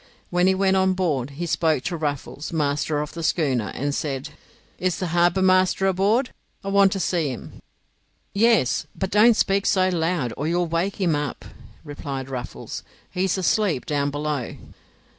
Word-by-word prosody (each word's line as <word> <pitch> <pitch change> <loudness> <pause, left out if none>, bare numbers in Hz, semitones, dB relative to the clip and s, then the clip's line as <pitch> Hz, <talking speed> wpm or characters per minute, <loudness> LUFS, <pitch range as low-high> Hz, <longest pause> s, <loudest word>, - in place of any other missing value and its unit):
When 180 +1 +3
he 190 - +4
went 190 0 +2
on 190 0 +3
board 155 -9 -1
he 175 - -2
spoke 160 -4 +1
to 175 - -2
Ruffles, 145 -1 -4
master 150 -1 0
of 150 - -6
the 165 - -6
schooner, 135 - +1
and 145 +1 -2
said: 140 -1 -3 0.5
"Is 185 -1 0
the 185 - -3
harbour 175 +2 +3
master 185 0 +3
aboard? 200 +7 +2 0.3
I 195 - -3
want 195 -1 +5
to 195 - -2
see 170 -5 0
him." 125 - -8 0.7
"Yes, 220 - +3
but 190 -1 -3
don't 220 +3 +6
speak 195 0 +2
so 185 -2 +3
loud, 165 -7 -1
or 145 - -3
you'll 175 +1 +1
wake 170 +5 -2
him 175 -5 +2
up," 145 -3 -4 0.4
replied 140 -3 -6
Ruffles. 125 -2 -6 0.3
"He 185 +1 0
is 190 - 0
asleep 190 -5 +1
down 145 -1 0
below." 145 -3 -3
170 Hz, 170 wpm, -23 LUFS, 145-190 Hz, 0.7 s, don't